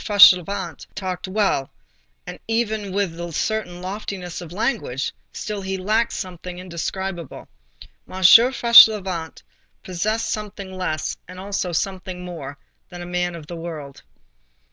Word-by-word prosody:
Fauchelevent 195 -3 +5
talked 185 -2 -4
well, 190 -9 0 0.6
and - - -8
even 220 -3 -1
with 185 -4 -1
a 170 0 -5
certain 180 0 -2
loftiness 185 -2 -5
of 170 -2 -9
language—still 195 - -3
he 190 0 -3
lacked 215 +5 +1
something 180 -1 -6
indescribable. 180 -1 -5 0.6
M. 190 0 -5
Fauchelevent 215 -6 +6 0.4
possessed 215 +5 -1
something 200 -3 -5
less 155 -4 -2
and 185 +1 -10
also 195 -2 -3
something 185 0 -3
more, 150 -6 -7 0.3
than 175 -1 -8
a - - -7
man 180 0 -2
of 160 -3 -9
the 170 - -7
world. 160 -5 -7
185 Hz, 120 wpm, -22 LUFS, 175-205 Hz, 0.6 s, Fauchelevent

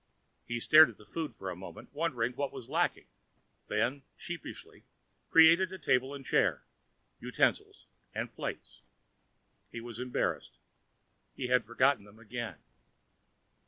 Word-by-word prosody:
He 120 0 -2
stared 155 +6 +8
at 115 - -13
the 105 - -16
food 155 +1 -5
for 95 -3 -5
a - - -6
moment, 95 +8 -11
wondering 135 -7 0
what 140 +2 -2
was 130 -4 -9
lacking; - - 0 0.6
then, 115 +7 0 0.2
sheepishly, - - -8 0.5
created 165 +3 +6
a 190 - -6
table 130 -3 +1
and 135 -1 -10
chair, 65 - +2 0.5
utensils - - 0 0.3
and - - -4
plates. - - -6 0.9
He 115 - -6
was 120 0 -8
embarrassed. 125 0 -2 0.8
He 125 -2 -4
had 125 0 +3
forgotten 130 0 +2
them 105 +1 -17
again. 115 +1 -6
125 Hz, 130 wpm, -31 LUFS, 115-140 Hz, 0.9 s, stared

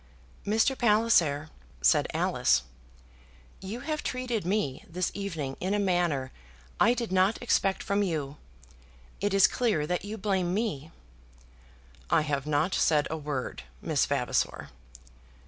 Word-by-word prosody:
"Mr. 225 +6 +2
Palliser," 210 - +2 0.3
said - - +4
Alice, 65 0 +2 1.0
"you 210 +6 -6
have 305 +1 -3
treated 245 -7 -3
me 180 -10 -1
this 180 +2 -1
evening 165 -9 -4
in 190 +3 -1
a - - +1
manner 175 -9 0 0.5
I 235 +3 +5
did 235 -5 -3
not 190 +3 +3
expect 195 -5 +1
from 200 +1 0
you. 150 -7 -2 0.8
It 205 +1 0
is 195 -1 +6
clear 220 -12 +1
that 180 +3 -2
you 210 +2 -5
blame 190 -3 0
me." 195 -9 -2 1.2
"I - - +4
have 145 -2 -2
not 155 +5 +1
said 150 -2 +3
a - - -1
word, 145 -4 -4 0.2
Miss - - +1
Vavasor." - - -1
185 Hz, 130 wpm, -28 LUFS, 150-215 Hz, 1.2 s, is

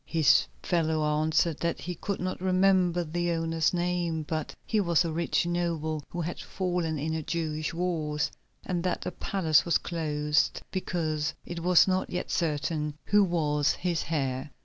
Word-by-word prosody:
His 160 -4 +4 0.2
fellow 160 -3 +1 0.2
answered 160 0 +1
that 170 0 -1
he 180 - -4
could 195 +4 -4
not 185 0 -3
remember 185 -2 +3
the 175 +2 -1
owner's 165 -1 +1
name, 175 -2 -1
but 155 0 -4
he 220 - +1
was 170 -3 +3
a 165 - -1
rich 170 +1 0
noble 165 -3 -1
who 175 - -4
had 170 +2 -4
fallen 175 -4 -2
in 155 +3 -2
the 160 - -1
Jewish 155 -1 -2
wars, 160 -4 -1 0.3
and 175 -2 -1
that 180 - -1
the - - -3
palace 160 -5 +2
was 170 - +3
closed 150 -3 0
because 155 -5 -1
it 175 - -5
was 180 +2 +5
not 185 0 0
yet 180 - -3
certain 150 -2 -1
who 205 0 +5
was 150 -5 +1
his 175 -3 -2
heir. 135 -3 -1
165 Hz, 165 wpm, -28 LUFS, 155-175 Hz, 0.3 s, was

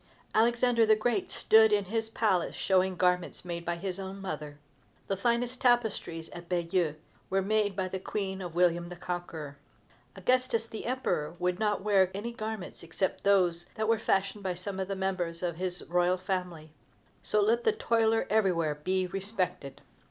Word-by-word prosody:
Alexander 235 +1 +3
the 215 -1 +5
Great 215 -2 0
stood 220 0 +5
in 205 -1 +2
his 225 +3 -2
palace 210 -6 +1
showing 190 -1 +2
garments 180 0 0
made 170 -1 -4
by 175 0 -1
his 185 +2 -4
own 195 +1 -6
mother. 150 -6 -5 0.5
The 195 - -1
finest 240 +4 0
tapestries 220 -9 +1
at 175 0 -10
Bayeux 170 -3 0 0.3
were 195 0 +1
made 210 -1 +1
by 190 -1 -1
the 190 +1 -4
Queen 190 0 -3
of 175 -2 -6
William 175 -1 +2
the 180 - -7
Conqueror. 165 -5 -6 0.6
Augustus 240 +3 +1
the 225 0 -7
Emperor 175 -11 -1
would 180 0 -1
not 210 -3 0
wear 195 -3 +4
any 220 +4 -4
garments 220 -4 -6
except 170 +3 -2
those 180 -4 +3
that 220 0 -1
were 225 -1 +3
fashioned 195 -1 0
by 185 -2 -1
some 190 +2 -5 0.2
member 190 -2 -1
of 175 -2 -2
his 180 0 -2
royal 180 +1 +2
family. 180 -4 -4 0.5
So 210 - +1
let 225 +3 +3
the - - +4
toiler 225 - +2
everywhere 180 -7 +2
be 185 +1 +1
respected! 185 -6 -2
190 Hz, 165 wpm, -30 LUFS, 175-215 Hz, 0.6 s, the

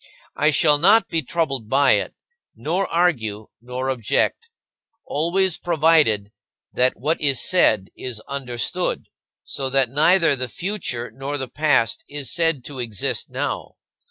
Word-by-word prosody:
I 150 - +3
shall 150 -1 +3
not 205 +7 +4
be 165 - 0
troubled 135 -6 -2
by 135 +2 +4
it, - - 0 0.4
nor 180 +5 -1
argue, 115 -12 0
nor 125 +2 -3
object 130 - -1 0.6
always 170 +4 0
provided 155 -11 +2 0.4
that 130 +1 +2
what 150 +7 -1
is 140 -3 +2
said 110 - +2
is 125 -4 -5
understood, 140 +7 -3 0.4
so 135 -1 -3
that 135 -3 +2
neither 165 +2 +4
the 130 -1 -3
future 160 - -4
nor 140 +2 -4
the 130 -2 -4
past 145 -7 +1
is 145 -2 -4
said 165 -6 0
to 140 -3 -8
exist 115 -5 -3
now. - - -4
140 Hz, 135 wpm, -22 LUFS, 125-165 Hz, 0.6 s, not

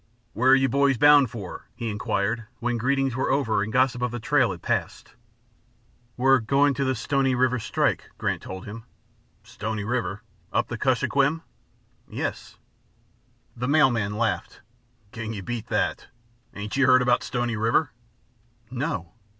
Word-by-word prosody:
"Where 125 +3 +2
are 135 - +8
you 135 0 +3
boys 140 +1 +2
bound 145 0 +6
for?" 105 -6 -8
he 120 -1 -5
inquired 110 +1 -1
when 120 -1 -1
greetings 135 +1 0
were 130 - -1
over 125 -7 +1
and 105 +2 -3
gossip 125 0 +2
of 125 - 0
the 120 +1 -5
trail - - +2
had - - -7
passed. - - -3 1.0
"We're 135 +1 +4
going 140 +5 +2
to 140 - -1
the 130 -1 0
Stony 135 +1 0
River 125 0 +2
strike," - - -1
Grant - - -2
told 95 +1 -8
him. 110 +2 -9 0.6
"Stony 110 0 -5
River? 110 -2 -2 0.3
Up - - 0
the - - -4
Kuskokwim?" 145 +4 +1 0.7
"Yes!" - - -5 1.0
The 125 +1 -3
mail 145 -1 +5
man 105 -3 -2
laughed. 115 -1 -2 0.5
"Can 110 -1 -5
you 100 -3 -6
beat 120 +1 -5
that? - - -1 0.5
Ain't 105 +1 -5
you 135 -1 +3
heard 130 0 +6
about 125 0 +3
Stony 120 -2 -2
River?" 115 +8 +1 0.8
"No!" 125 - -3
120 Hz, 155 wpm, -25 LUFS, 110-135 Hz, 1.0 s, are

